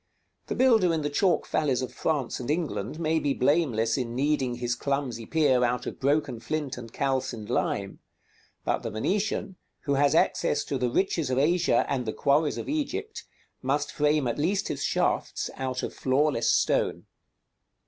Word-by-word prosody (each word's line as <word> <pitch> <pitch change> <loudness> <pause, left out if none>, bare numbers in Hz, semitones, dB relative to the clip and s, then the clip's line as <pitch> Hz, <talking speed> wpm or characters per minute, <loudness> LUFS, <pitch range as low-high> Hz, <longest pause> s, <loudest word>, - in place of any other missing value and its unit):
The - - -2
builder 225 -9 +4
in 155 - -2
the 145 - -2
chalk 175 +2 +2
valleys 135 -5 +1
of 125 - -5
France 145 -6 -1
and 125 +1 -6
England 155 0 -2
may 160 0 +1
be 145 -3 0
blameless 125 -6 +2
in 120 -2 -3
kneading 135 -2 +1
his 120 0 -1
clumsy 125 -3 -2
pier 145 -6 +3
out 125 0 0
of - - -6
broken 140 -3 +1
flint 150 +2 -3
and 115 -2 -9
calcined 130 -5 -2
lime; 100 -5 -1 0.7
but - - +1
the - - -4
Venetian, 195 - -1 0.2
who 140 - -1
has 140 +2 +3
access 145 -2 +2
to 135 - -3
the 125 -1 +1
riches 165 0 0
of 130 - 0
Asia 170 +5 +3
and 130 -4 -2
the 110 - -1
quarries 145 +2 +2
of - - -5
Egypt, 380 +9 -3 0.4
must 140 +2 0
frame 150 -2 +1
at 120 +3 -2
least 190 +6 0
his - - -3
shafts - - 0
out 130 -1 -3
of - - -3
flawless 130 -2 +1
stone. - - +1
140 Hz, 170 wpm, -27 LUFS, 125-160 Hz, 0.7 s, builder